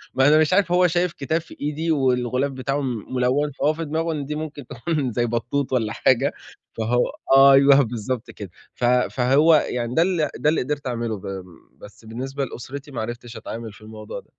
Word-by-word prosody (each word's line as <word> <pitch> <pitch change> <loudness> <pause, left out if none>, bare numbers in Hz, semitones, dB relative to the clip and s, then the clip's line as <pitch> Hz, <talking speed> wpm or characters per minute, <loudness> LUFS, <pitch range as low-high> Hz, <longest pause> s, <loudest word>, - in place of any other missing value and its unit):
ما 135 +1 +4
أنا 155 +1 +6
مش 155 +3 +2
عارف 185 -3 +3
هو 180 0 +4
شايف 175 0 0
كتاب 160 +4 -2
في 160 - -15
إيدي 155 +3 -1
والغلاف 130 -1 +1
بتاعه 135 +2 -2
م 125 -2 -4
مُلوَّن 135 +4 +1
فهو 150 +3 0
في 165 +1 -5
دماغه 160 +2 -1
إن 145 -2 -4
دي 150 +1 -4
ممكن 150 -3 -6
تكون 140 0 -2
زي 120 +1 0
بطوط 125 +4 -2
والّا 110 -4 0
حاجة - - +2 0.4
فهو 115 +2 +1 0.5
أيوه 140 0 +6
بالضبط 115 +1 -4
كده. 100 -4 -9 0.2
ف - - -9
فهو 130 +5 +4
يعني 125 -4 -1
ده 165 - +4
ال 175 -4 +1
ده 150 - +2
اللي 160 - +1
قدرت 145 0 -4
أعمله 115 -3 -2
ب 95 -1 -7 0.3
بس 110 +2 -15
بالنسبة 135 +5 -4
لأسرتي 140 +4 -8
ما 120 - -4
عرفتش 120 0 -7
أتعامل 110 -1 -7
في 105 - -17
الموضوع 110 0 -8
ده. - - -20
135 Hz, 195 wpm, -22 LUFS, 120-150 Hz, 0.5 s, أنا